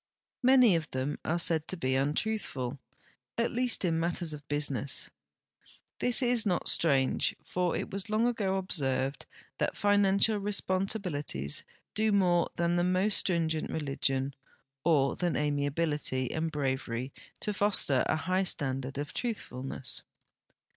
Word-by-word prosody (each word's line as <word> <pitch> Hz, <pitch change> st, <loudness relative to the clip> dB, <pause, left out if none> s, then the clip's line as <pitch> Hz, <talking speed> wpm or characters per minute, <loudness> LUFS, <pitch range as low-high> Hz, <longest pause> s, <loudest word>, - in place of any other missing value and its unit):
Many 255 Hz, -6 st, +6 dB
of 165 Hz, -1 st, -2 dB
them 130 Hz, +3 st, -3 dB
are 170 Hz, -, 0 dB
said 160 Hz, -2 st, +2 dB
to 185 Hz, -, -5 dB
be 130 Hz, -4 st, 0 dB
untruthful, 140 Hz, -, -1 dB, 0.6 s
at 230 Hz, -, +1 dB
least 245 Hz, -4 st, +2 dB
in 165 Hz, -2 st, +1 dB
matters 170 Hz, -1 st, -1 dB
of 145 Hz, -1 st, -10 dB
business. 145 Hz, -2 st, +2 dB, 0.9 s
'I'liis 245 Hz, +2 st, +3 dB
is 240 Hz, -2 st, +3 dB
not 185 Hz, -6 st, 0 dB
strange, 135 Hz, -5 st, +2 dB
for 180 Hz, -1 st, -1 dB
it -, -, -5 dB
was 195 Hz, +2 st, -3 dB
long 215 Hz, +2 st, +2 dB
ago 205 Hz, -6 st, 0 dB
observed 135 Hz, -7 st, -1 dB, 0.3 s
that -, -, -1 dB
financial 205 Hz, +1 st, +3 dB
responsibilities 185 Hz, -, -2 dB, 0.3 s
do 215 Hz, 0 st, +1 dB
more 180 Hz, -4 st, +3 dB
than 170 Hz, 0 st, +1 dB
the 175 Hz, -, +2 dB
most 185 Hz, +3 st, +2 dB
stringent 160 Hz, -3 st, 0 dB
re -, -, -3 dB
ligion 135 Hz, -1 st, -1 dB, 0.5 s
or 145 Hz, -4 st, +3 dB
than 175 Hz, -5 st, -1 dB
amiability 145 Hz, -2 st, 0 dB
and 160 Hz, 0 st, -2 dB
bravery 130 Hz, -3 st, -2 dB, 0.3 s
to 210 Hz, -, -1 dB
foster 200 Hz, -10 st, +3 dB
a -, -, +2 dB
high 185 Hz, +4 st, 0 dB
standard 135 Hz, -6 st, -3 dB
()f 145 Hz, +1 st, -4 dB
truth 235 Hz, -3 st, -2 dB
fulnc.ss. 130 Hz, 0 st, -5 dB
165 Hz, 140 wpm, -30 LUFS, 140-195 Hz, 0.9 s, Many